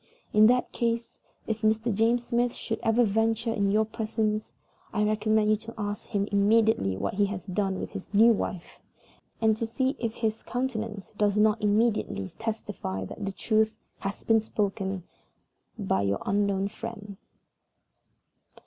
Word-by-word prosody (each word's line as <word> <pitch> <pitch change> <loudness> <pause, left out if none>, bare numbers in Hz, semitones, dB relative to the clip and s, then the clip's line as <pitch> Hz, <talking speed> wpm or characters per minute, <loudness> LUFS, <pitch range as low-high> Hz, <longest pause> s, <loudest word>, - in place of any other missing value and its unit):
In 215 0 +7
that 250 +1 +2
case, 235 0 -2 0.3
if 220 0 -3
Mr. 220 +1 +2
James 230 +3 +2
Smith 240 0 0
should 225 - -4
ever 225 +2 +3
venture 225 +2 +1
into 200 -2 +1
your 215 +1 +3
presence, 215 -1 -2 0.4
I 210 -1 +1
recommend 215 0 +2
you - - +5
to 225 +2 -10
ask 205 -1 -4
him 200 -3 0
suddenly 205 - +3
what - - -2
he 200 +1 +2
has 190 -3 -5
done 195 0 -1
with - - -5
his 200 -3 -8
new 220 +3 +6
wife, 185 -4 -4 0.6
and 220 -1 +4
to 225 +1 -3
see 260 +4 0
if 230 -2 -2
his 220 -1 -1
countenance 225 -5 -4
does 205 -1 +2
not 215 +1 +3
immediately 210 - +1
testify 205 - -4
that 205 - -8
the - - -1
truth 220 +2 +1 0.2
has 195 0 -5
been 225 -1 +4
spoken 195 -3 -2 0.7
by 95 - 0
"YOUR 100 0 +1
UNKNOWN 200 -1 +1
FRIEND." 205 -2 -8
215 Hz, 155 wpm, -27 LUFS, 200-225 Hz, 0.7 s, In